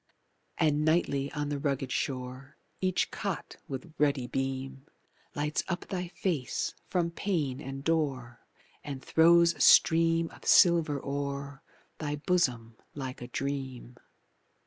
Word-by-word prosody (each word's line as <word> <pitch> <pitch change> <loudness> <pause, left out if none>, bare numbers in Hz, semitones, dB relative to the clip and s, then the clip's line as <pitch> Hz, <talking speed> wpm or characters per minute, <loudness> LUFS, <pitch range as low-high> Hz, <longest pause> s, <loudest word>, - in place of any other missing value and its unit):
And 150 -2 +2
nightly 145 -3 +1
on 145 -1 -2
the 145 -1 -2
rugged 135 -2 -2
shore 130 +1 -4 0.2
Each 185 -1 0
cot 195 -4 -4
with 140 +4 -7
ruddy 140 -3 +2
beam 135 +2 -4 0.5
Lights 150 +1 -1
up 175 -1 -3
thy 180 -2 -3
face 170 -7 -2 0.2
from 170 -2 0
pane 155 -8 -2
and 135 -2 -6
door 135 -7 -1 0.4
And 135 -2 -7
throws 170 +1 +5
a - - -8
stream 165 0 +5
of - - -15
silver 165 -5 +5
o'er 140 0 -4 0.4
Thy 150 -1 -2
bosom 125 -9 0 0.2
like 130 -3 -6
a 120 - -6
dream. 130 -2 -4
145 Hz, 125 wpm, -29 LUFS, 135-165 Hz, 0.5 s, throws